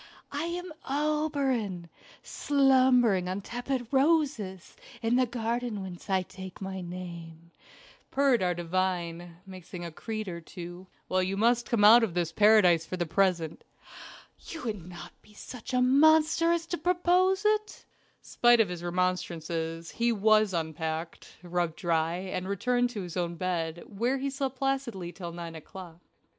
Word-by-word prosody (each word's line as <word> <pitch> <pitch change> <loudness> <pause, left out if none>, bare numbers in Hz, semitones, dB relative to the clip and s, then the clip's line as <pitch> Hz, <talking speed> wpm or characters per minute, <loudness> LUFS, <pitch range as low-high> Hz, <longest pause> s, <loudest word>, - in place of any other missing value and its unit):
"I 290 +3 -2
am 350 0 -5 0.2
Oberon, 275 - -1 0.4
slumbering 255 -9 +3
on 190 +2 -3
tepid 245 +3 -3
roses 270 - +1 0.3
in 225 +2 +2
the 255 0 +3
garden 235 -1 -2
whence 185 +1 -9
I 190 -1 +2
take 190 0 -10
my 190 -1 -5
name," 170 -2 -9 0.6
purred 270 -4 +3
our 180 -1 +1
divine, 175 -1 -2
mixing 185 -2 -9
a 170 - -6
creed 215 +5 -5
or 170 -2 -5
two. 175 +2 -9 0.2
"Well, 185 0 +1
you 190 +1 -2
must 235 +2 +2
come 225 -4 +2
out 225 +3 +9
of 190 -7 -1
this 170 -2 0
paradise 200 -4 +5
for 185 - -5
the 175 - -1
present." 170 -2 0 0.8
"You 330 - -9
wouldn't 185 -7 -5 0.3
be 210 - -21
such 250 +3 -9
a 250 0 +2
monster 315 +5 +4
as 340 -1 0
to 345 +1 -4
propose 360 +3 +2
it." 425 0 0 0.4
Spite 240 0 +4
of 215 -5 +3
his 175 -1 -6
remonstances, 170 -2 -2
he 235 +1 +1
was 215 -1 +3
unpacked, 160 -1 -4
rubbed 175 -2 -1
dry, 165 -2 0
and 185 0 -4
returned 245 +5 +1
to 215 -5 -5
his 175 -2 -8
own 170 -1 -2
bed, 170 -2 -3
where 235 +6 -1
he 275 +1 -2
slept 270 -1 -3
placidly 255 -10 -2
till 175 -1 -7
nine 170 -1 -7
o'clock. 170 +1 -11
195 Hz, 150 wpm, -28 LUFS, 175-255 Hz, 0.8 s, out